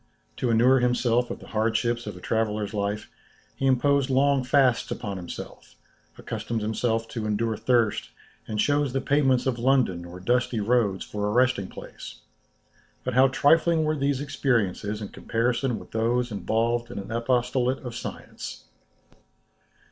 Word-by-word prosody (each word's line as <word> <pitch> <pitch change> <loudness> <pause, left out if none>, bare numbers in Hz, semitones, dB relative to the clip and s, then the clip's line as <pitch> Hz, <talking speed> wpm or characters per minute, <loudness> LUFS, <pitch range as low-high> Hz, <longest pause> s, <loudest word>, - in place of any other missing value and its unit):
To 125 - -1
inure 125 +4 +5
himself 125 0 +2
to - - -4
the - - -14
hardships 115 +2 0
of 100 -3 -6
a - - -10
traveller's 105 0 -1
life, 105 0 -2 0.5
he 135 - 0
imposed 140 +1 +3
long 135 0 +3
fasts 130 -2 +3
upon 100 -4 -4
himself, 90 -2 -9 0.4
accustomed 115 -2 -4
himself 115 +1 0
to 110 -3 -4
endure 110 +1 0
thirst, 115 -1 +1 0.4
and 110 - -4
chose 145 +3 +1
the 135 - +1
pavements 135 -2 +2
of 125 -3 0
London 120 -9 +2
or 85 +1 -9
dusty 120 +3 +1
roads 105 -3 +1
for 105 -1 -3
a - - 0
resting 125 -4 +2
place. - - -10 0.8
But 130 - -2
how 130 +2 +6
trifling 160 +4 +3
were 155 0 +1
these 140 -1 0
experiences 115 -7 -1
in 100 - -6
comparison 120 +1 -1
with - - -12
those 120 +2 0
involved 115 +3 0
in 120 - -8
an 100 +1 -6
apostolate 125 +2 0
of 120 - -5
science! - - -7
120 Hz, 150 wpm, -26 LUFS, 110-130 Hz, 0.8 s, how